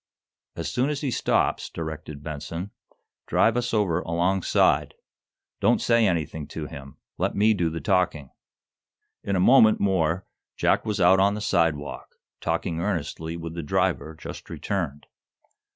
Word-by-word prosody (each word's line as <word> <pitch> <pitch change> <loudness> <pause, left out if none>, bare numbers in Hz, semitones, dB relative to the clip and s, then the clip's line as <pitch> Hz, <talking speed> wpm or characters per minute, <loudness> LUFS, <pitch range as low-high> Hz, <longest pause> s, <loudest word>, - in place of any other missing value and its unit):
"As 85 - -4
soon 130 +3 0
as 145 -2 -2
he 140 -4 -1
stops," - - +1
directed 75 -2 -7
Benson, 80 +5 -5 0.6
"drive 115 - +3
us 125 0 -1
over 100 -7 +1
alongside. 90 +3 +1 0.6
Don't - - +3
say 115 -2 +3
anything 80 -4 -2
to - - -6
him. 70 -1 -10 0.2
Let - - 0
me 110 +2 +4
do 85 -5 0
the 80 +1 -4
talking." 90 -8 0 0.9
In 100 - -1
a - - +2
moment 110 +2 +6
more 95 -2 +1 0.3
Jack - - +2
was 105 - -1
out 95 +2 +5
on 100 +1 +3
the - - -4
sidewalk, 80 -7 -1 0.2
talking 80 - -2
earnestly 85 -3 -3
with 85 -1 -6
the 85 - -4
driver 90 -1 0
just - - -9
returned. 80 -8 -3
85 Hz, 145 wpm, -25 LUFS, 80-100 Hz, 0.9 s, moment